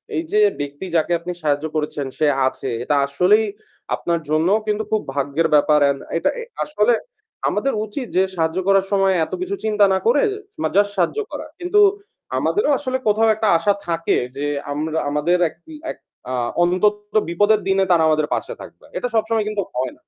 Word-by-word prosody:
এই 325 - 0
যে 425 - +3 0.2
ব্যক্তি 145 +5 -5
যাকে 165 +1 +1
আপনি 175 +1 -5
সাহায্য 145 0 0
করেছেন 150 -2 -2
সে 155 - +2 0.2
আছে 130 0 -4
এটা 145 - +1
আসলেই 180 +10 +3 0.5
আপনার 170 -1 -1
জন্যেও 165 +7 +3
কিন্তু 210 +1 0
খুব 215 -1 +2
ভাগ্যের 140 +4 0
ব্যাপার। 150 +1 +4
এন 140 - 0 0.2
এটা - - +1 0.4
আসলে 240 -5 +2 0.6
আমাদের 275 - 0
উচিত 245 +4 -6
যে 190 - +5
সাহায্য 160 +1 0
করার 195 -1 +4
সময় 195 -1 +3
এত - - -12
কিছু 375 +2 -2
চিন্তা 210 -2 +3
না - - +3
করে 475 - +4 0.4
মা - - +2
জাস্ট 205 0 +4
সাহায্য 185 - +1
করা। - - -6
কিন্তু 360 +4 +2 0.6
আমাদেরও 410 -7 +1
আসলে 260 -2 -2
কোথাও 215 +2 +3
একটা 220 0 -1
আশা 185 +5 +2
থাকে 165 -1 0 0.2
যে 145 - -3 0.3
আমরা 155 +2 -2
আমাদের 150 +5 +1
এক - - -19 0.4
এক - - -11 0.3
আ - - -2 0.3
অন্তত 185 +4 +2 0.3
বিপদের 205 +5 +3
দিনে 195 0 +3
তারা 165 -2 +4
আমাদের 155 -1 +2
পাশে - - -3
থাকবে। - - -13
এটা - - -1
সবসময় 220 -1 +1
কিন্তু 210 -1 -1
হয় 125 0 -1
না। - - -28
185 Hz, 180 wpm, -20 LUFS, 155-215 Hz, 0.6 s, যে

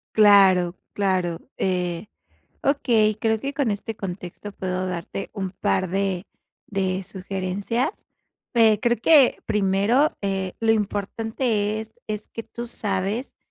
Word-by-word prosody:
Claro, 195 -4 +6 0.2
claro. 185 -4 0 0.2
Eh, 180 -1 -1 0.6
okey, 230 -6 +3
creo 220 0 +1
que 275 +5 -4
con 280 -5 0
este 205 +2 -3
contexto, 190 +1 -7
puedo 185 -1 -3
darte 180 +2 -5
un 190 -2 -3
par 185 0 0
de 195 0 -1 0.4
de 190 -1 -1
sugerencias. 195 - -3 0.5
Pe 220 -3 +5
creo 240 +1 +2
que, 275 +2 +6
primero, 210 +8 +2
eh, 195 -2 -2
lo 225 -1 +4
importante 215 +1 -1
es 220 0 -11
es 210 0 -4
que 230 - -6
tú 240 +1 -7
sabes 205 +2 -2
200 Hz, 125 wpm, -24 LUFS, 190-225 Hz, 0.6 s, Claro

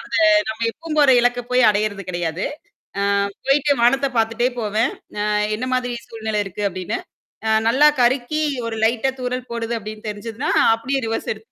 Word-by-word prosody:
அத - - -9 0.3
நம்ப 220 +1 -5
எப்பவும் 315 +4 -7
போற 285 -2 +6
இலக்க 245 0 +1
போயி 250 0 +4
அடையறது 205 -1 -1
கிடையாது. 175 0 -2 0.8
அ - - -2 0.2
போயிட்டு 285 +1 +3
வானத்தப் 270 +2 +2
பாத்துட்டே 225 +2 +1
போவேன். 220 +3 0 0.2
நா 205 - -1 0.3
"என்னா 255 +4 -4
மாதிரி 245 -1 -2
சூழ்நிலை 220 -2 -2
இருக்கு?" 195 +2 -6
அப்படின்னு. 185 -1 -4 0.5
அ - - +2 0.2
நல்லா 275 +6 +6
கருக்கி 260 +5 +1 0.2
ஒரு 225 - -4
லைட்டா 235 +3 +1
தூறல் 250 0 -3
போடுது 235 0 -3
அப்படின்னு 215 +1 -8
தெரிஞ்சுதுன்னா, 225 +7 -4 0.2
அப்படியே 265 +4 -2
ரிவர்ஸ் 225 - -2
எடுத்து 220 +1 -18
230 Hz, 160 wpm, -21 LUFS, 215-255 Hz, 0.8 s, போற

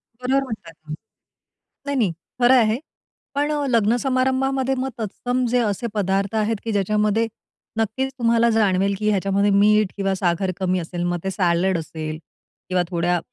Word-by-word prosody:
बरोबर 255 +3 0
म्हणतात 215 -10 -7
तुम्ही. 155 -1 -8 0.9
नाही, 280 -1 -1
नाही. 215 -8 +2 0.3
खरं 245 +2 +6
आहे. 225 0 +3 0.6
पण 290 +1 +1
अ, 295 -1 0
लग्न 230 -2 +3
समारंभामध्ये 265 0 +1
मग 260 +1 -2
तत्सम 245 +4 -2
जे 250 +1 +2
असे 215 +1 -1
पदार्थ 195 0 0
आहेत 220 +1 +1
की 225 - -2
ज्याच्यामध्ये 210 +2 +1 0.5
नक्कीच 245 +5 -1
तुम्हाला 235 0 +3
जाणवेल 200 -3 +2
की 215 0 +1
ह्याच्यामध्ये 200 0 +2
मीठ 210 0 +4
किंवा 195 -1 0
साखर 185 0 0
कमी 185 -1 0
असेल. 175 +1 -4
मग 175 0 0
ते 190 - -2
सॅलड 180 0 +1
असेल 155 -1 -5 0.5
किंवा 180 -1 +2
थोड्या 175 0 +1
210 Hz, 160 wpm, -22 LUFS, 185-245 Hz, 0.9 s, खरं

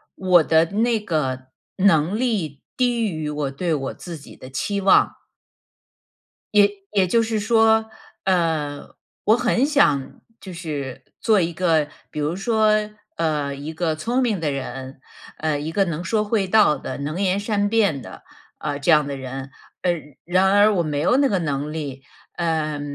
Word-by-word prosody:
我 180 -3 +4
的 160 +1 +4
那 220 +5 +1
个 135 -9 -2 0.3
能 185 0 +3
力 190 - -1 0.2
低 245 -2 +1
于 155 -3 -4
我 145 -2 -2
对 165 +4 -1
我 135 -3 -2
自 170 -3 -8
己 140 - -14
的 130 - -11
期 195 - -2
望。 190 - +3 1.3
也 205 -1 +6 0.2
也 195 -3 +2
就 230 +5 +3
是 220 -1 -1
说， 220 0 +3 0.4
呃， 160 -6 0 0.4
我 215 +2 +5
很 245 +1 +2
想 170 - +1 0.2
就 190 -2 -9
是 140 -6 -5 0.2
做 215 -4 +3
一 165 - -1
个， 160 -3 +1 0.2
比 - - -5
如 150 +4 -1
说， 215 +1 +2 0.4
呃， 150 -4 -1
一 150 +3 -7
个 160 -1 -1
聪 235 +12 -1
明 225 -7 0
的 155 -3 -1
人， 130 0 -6 0.4
呃， 155 -2 -1
一 155 +2 -4
个 195 +4 +2
能 170 0 -3
说 210 +4 +1
会 205 -3 0
道 205 -7 +4
的、 - - -6
能 150 +5 -4
言 195 0 +1
善 205 -1 0
辩 200 - +1
的， - - -11 0.4
呃， 145 - -3
这 145 +4 +1
样 150 -2 +4
的 140 -1 -4
人， 135 +1 -6 0.3
嗯 165 -6 -2
然 185 +3 +3
而 205 +1 +6
我 175 - +2
没 150 -2 -2
有 250 - +3
那 280 - +4
个 200 -7 0
能 150 -2 -2
力， 140 -4 -5 0.3
呃， 160 -3 -1
170 Hz, 180 characters per minute, -22 LUFS, 145-205 Hz, 1.3 s, 也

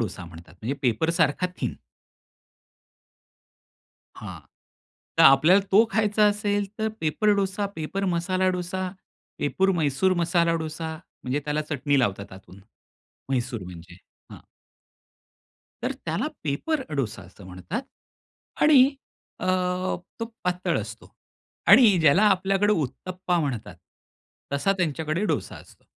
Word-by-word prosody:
डोसा 95 -5 -4
म्हणतात, 85 0 -13
म्हणजे 125 +6 -2
पेपर 125 +6 +1
सारखा 165 +1 +1
थीन. - - -2 2.4
हां. - - -8 0.8
तर - - +7
आपल्याला 155 +9 +7
तो 215 +4 +7
खायचा 210 0 +3
असेल 205 -1 0
तर 220 0 0
paper 160 +7 +1
dosa, 200 +1 -1
paper 175 +5 -3
masala 185 +2 0
dosa, 185 +1 -3 0.5
paper 190 +6 +1
Mysore 155 +4 +2
masala 170 0 +2
dosa, 160 0 -5 0.3
म्हणजे 130 +3 -1
त्याला 150 +1 -1
चटणी 145 -1 +1
लावतात 100 -6 -1
आतून. 95 0 -14 0.7
म्हैसूर 125 -4 -2
म्हणजे 90 0 -11 0.4
हां. - - -11 1.4
तर - - -1
त्याला - - -1 0.2
पेपर 265 - -1
डोसा 110 -7 -3
असं 95 +2 -15
म्हणतात. 95 - -5 0.8
आणि 275 -2 +6 0.5
अ, - - -3 0.7
तो - - 0 0.2
पातळ 180 0 0
असतो. - - -10 0.5
आणि 215 -8 +7
ज्याला 160 +6 +5
आपल्याकडे 195 +1 +2
उत्तप्पा 180 +4 -2
म्हणतात. 135 -8 -4 0.8
तसा 140 +8 +2
त्यांच्याकडे 160 +1 -1
डोसा - - -2
असतो. - - -17
165 Hz, 115 wpm, -25 LUFS, 135-195 Hz, 2.4 s, तर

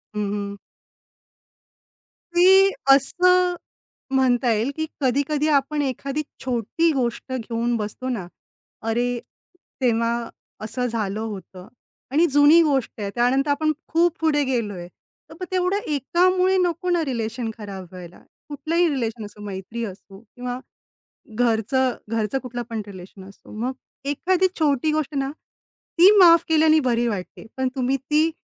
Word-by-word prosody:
हं, - - -2
हं. 200 -1 -4 1.8
ते 385 +2 +6 0.2
असं 360 +6 +4 0.6
म्हणता 250 -2 +3
येईल 225 +5 0
की 315 - -2 0.2
कधी-कधी 285 +3 +1
आपण 295 +2 -1
एखादी 275 +2 -2 0.2
छोटी 255 +6 0
गोष्ट 250 -1 -2
घेऊन 235 -1 -2
बसतो 215 +4 -5
ना, 210 -9 -3 0.5
अरे 240 +2 -1 0.6
तेव्हा 230 -2 +2 0.5
असं 250 +3 -2
झालं 215 -3 -2
होतं 190 -4 -7 0.4
आणि 315 +5 +4
जुनी 290 +4 +7
गोष्ट 270 -7 -1
आहे. 200 - -2
त्यानंतर 265 +4 +2
आपण 310 +2 +1 0.2
खूप 340 0 +2
पुढे 300 -2 +2
गेलोय. 210 -9 -3 0.4
तर - - -11
मग 365 - -4
तेवढं 370 +1 +1
एकामुळे 365 +6 +2
नको 355 0 0
ना 345 -2 +2
रिलेशन 230 -2 -3
खराब 200 -3 -7
व्हायला. 180 -1 -11 0.3
कुठलाही 315 +5 0
रिलेशन 230 -6 -3
असो, 210 0 -12
मैत्री 205 +3 -6
असो 195 -1 -11
किंवा 245 +2 -7 0.8
घरचं, 245 +3 +1 0.2
घरचं 225 +2 -1
कुठलं 245 -2 -6
पण 225 -2 -3
रिलेशन 190 0 -11
असो. 195 - -17
मग 250 +3 -1 0.4
एखादी 370 +5 +2
छोटी 300 -1 +2
गोष्ट 305 -1 -2
ना, 275 0 -1
ती 345 +4 +1
माफ 335 -3 +7
केल्यानी 315 0 +5
बरी 240 0 +1
वाटते 200 -3 -5
पण 260 0 0
तुम्ही 260 +1 0
ती 300 +4 +1
260 Hz, 135 wpm, -23 LUFS, 225-310 Hz, 1.8 s, जुनी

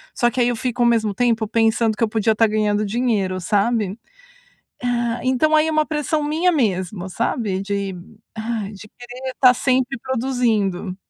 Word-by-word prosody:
só 240 - +2
que 255 - -4
aí 240 - +3
eu 240 - -1
fico 245 0 -2
ao 240 - +4
mesmo 220 -3 +2
tempo 230 0 +1
pensando, 225 0 +2
que 230 - 0
eu 220 - +2
podia 220 0 +1
tá 225 - +4
ganhando 210 -1 0
dinheiro 205 -4 0
sabe? 210 0 0 0.9
Ah, 240 -1 -1
então 285 +5 +3
aí 305 +1 +3
é - - +1
uma 310 0 +2
pressão 300 0 -1
minha 325 +4 +1
mesmo, 190 - -1
sabe, 200 -1 -2
de, 200 -1 -3 0.4
ai, 220 -2 -3
de 210 +1 -12
querer 250 +1 -7
tá 255 -2 +8
sempre 255 +1 0
produzindo. 230 -8 -1
230 Hz, 175 wpm, -21 LUFS, 210-255 Hz, 0.9 s, tá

